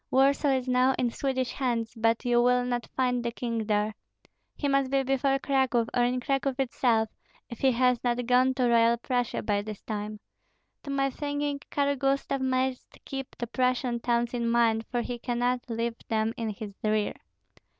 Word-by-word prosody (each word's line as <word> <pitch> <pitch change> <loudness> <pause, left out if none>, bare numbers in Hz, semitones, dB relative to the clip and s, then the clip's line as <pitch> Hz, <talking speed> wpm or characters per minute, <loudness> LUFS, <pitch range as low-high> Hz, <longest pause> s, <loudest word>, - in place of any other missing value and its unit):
Warsaw 275 +2 +3
is 260 -1 -2
now 255 +1 +3
in 245 -2 +1
Swedish 260 -1 -1
hands, 235 -4 -1
but 225 +2 +1
you 240 -1 +4
will 250 0 +3
not 245 -1 -2
find 250 -2 +1
the 235 - -1
king 230 -2 -3
there. 210 0 +1 0.6
He 290 - -2
must 275 -1 +2
be 270 0 +2
before 270 +1 +1
Cracow, 265 -4 +1
or 245 - +3
in 250 +1 +1
Cracow 270 +1 0
itself, 240 -4 +1 0.4
if 235 - -7
he 265 - +4
has 250 0 +2
not 245 0 0
gone 255 +2 +3
to 250 -2 +2
Royal 235 0 +4
Prussia 245 0 -1
by 205 -1 +1
this 210 -1 -8
time. 210 -1 -4 0.7
To - - -6
my 275 -1 +1
thinking 290 0 -2
Karl 285 0 +1
Gustav 275 0 0
must 260 0 -1
keep 270 -1 -6
the 240 - -3
Prussian 250 0 0
towns 235 0 0
in 235 -1 0
mind, 230 -2 +2
for 245 -1 -1
he 240 0 -5
cannot 245 +1 -1
leave 230 0 -2
them 220 0 +1
in 225 -1 -3
his 210 0 -6
rear. 215 -1 +1
245 Hz, 180 wpm, -28 LUFS, 230-265 Hz, 0.7 s, you